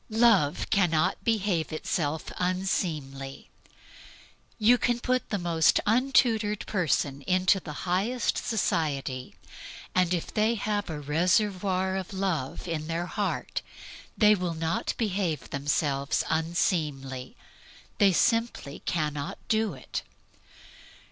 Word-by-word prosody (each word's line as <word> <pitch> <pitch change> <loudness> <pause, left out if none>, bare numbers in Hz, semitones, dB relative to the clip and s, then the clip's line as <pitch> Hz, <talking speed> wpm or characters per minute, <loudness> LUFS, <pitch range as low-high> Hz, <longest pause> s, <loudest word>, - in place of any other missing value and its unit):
Love 220 -10 +3
cannot 175 -4 +2
behave 200 -8 0
itself 155 0 -2
unseemly. 155 -7 -2 1.1
You 235 +3 +5
can 240 +1 +1
put 255 0 0
the 205 - 0
most 170 -3 +3
untutored 225 -3 +2
persons 145 -7 0
into 185 +1 +3
the 170 - -8
highest 200 +8 0
society, 145 - -1 0.6
and 180 -1 +2
if 175 -2 -2
they 220 +2 +2
have 205 -2 -2
a 155 -2 -4
reservoir 185 +5 +1
of 190 +1 -5
Love 180 -7 -2
in 155 -2 -3
their 165 +1 -2
heart - - -2 0.6
they 210 -1 +6
will 180 -4 -1
not 160 +1 -1
behave 190 -8 -1
themselves 140 0 0
unseemly. 150 -6 -1 0.6
They 200 -2 +6
simply 230 -7 +1
cannot 150 -3 -2
do 220 -6 +1
it. 130 - -5
180 Hz, 110 wpm, -28 LUFS, 155-210 Hz, 1.1 s, they